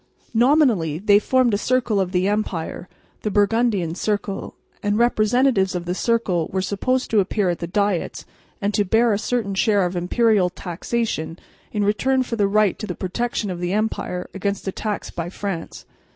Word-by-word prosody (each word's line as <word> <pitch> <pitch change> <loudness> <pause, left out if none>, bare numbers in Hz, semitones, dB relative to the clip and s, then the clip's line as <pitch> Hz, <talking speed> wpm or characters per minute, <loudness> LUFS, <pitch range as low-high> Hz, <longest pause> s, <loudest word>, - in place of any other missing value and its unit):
Nominally, 235 - +3
they 205 +3 +4
formed 255 +1 +2
a 205 - +1
circle 240 -4 +1
of 185 -2 0
the 185 0 +1
empire, 190 -4 -2 0.3
the 215 - -1
Burgundian 205 -4 +1
circle 205 +1 -3 0.3
and 205 0 0
representatives 235 -3 +2
of 175 -1 -3
the 175 - -1
circle 190 -6 0
were 190 0 -2
supposed 250 +7 -1
to 220 - +4
appear 195 0 +1
at 170 - -4
the 170 - -4
diets 200 -1 -1 0.3
and 205 -1 -1
to 205 - +2
bear 225 +3 +3
a 200 - 0
certain 225 -3 -1
share 200 -1 +2
of 180 +1 -3
imperial 195 +2 +2
taxation 175 -1 -3 0.3
in 210 -1 0
return 260 +6 +2
for 245 - -4
the 205 -3 +2
right 210 -1 +2
to 215 - -5
the 180 - -4
protection 210 +1 -2
of 175 - -5
the 175 +1 -2
empire 210 -4 -2
against 200 0 -3
attacks 210 +2 -3
by 170 0 -4
France. 190 -3 -5
205 Hz, 175 wpm, -22 LUFS, 185-225 Hz, 0.3 s, they